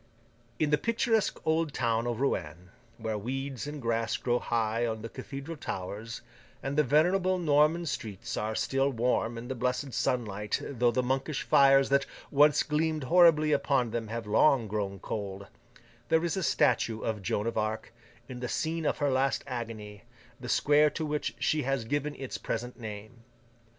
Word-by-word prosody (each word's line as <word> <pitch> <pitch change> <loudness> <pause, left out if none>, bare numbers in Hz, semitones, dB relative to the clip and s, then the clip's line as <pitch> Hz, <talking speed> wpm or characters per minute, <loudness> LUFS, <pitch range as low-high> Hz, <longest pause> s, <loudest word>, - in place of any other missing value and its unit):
In 150 +2 +1
the 150 - +3
picturesque 230 -1 +1
old 160 -2 +1
town 115 -1 0
of 120 -1 -2
Rouen, 90 - -2 0.3
where 110 -2 -3
weeds 135 +4 -4
and 150 0 -5
grass 115 -2 0
grow 120 0 0
high 115 0 0
on 110 -2 -2
the 115 - -5
cathedral 140 +7 -7
towers, 105 +2 -5 0.4
and 135 +1 -2
the 150 - +4
venerable 180 +7 +3
Norman 155 +1 +3
streets 110 - -4
are 110 +1 -2
still 135 +3 +1
warm 120 -2 0
in 115 +1 -7
the 130 - -3
blessed 125 +2 -2
sunlight 105 -4 -1
though 125 -3 +1
the 125 +2 0
monkish 135 +3 -1
fires 135 -1 +5
that 140 0 +2 0.2
once 145 +1 +5
gleamed 155 0 0
horribly 155 0 +5
upon 135 -5 +1
them 115 -1 -3
have 115 +1 -4
long 115 +3 +3
grown 100 -2 -3
cold, 100 0 -5 0.6
there 160 +1 +3
is 170 - -1
a 190 - -1
statue 115 -8 +2
of 110 -2 -2
Joan 100 +3 -1
of 115 - -2
Arc, 110 +1 -2 0.3
in 125 -1 -7
the 125 -1 -4
scene 160 -1 -1
of - - 0
her 145 -2 +1
last 135 +1 +1
agony, 110 -5 -6 0.3
the 125 -1 -7
square 150 +3 +4
to 155 +2 -4
which 150 0 -2
she 155 - +1
has 135 -3 -1
given 145 +4 -2
its 135 -2 -6
present 125 +1 -4
name. 110 +1 -8
125 Hz, 170 wpm, -29 LUFS, 110-150 Hz, 0.6 s, fires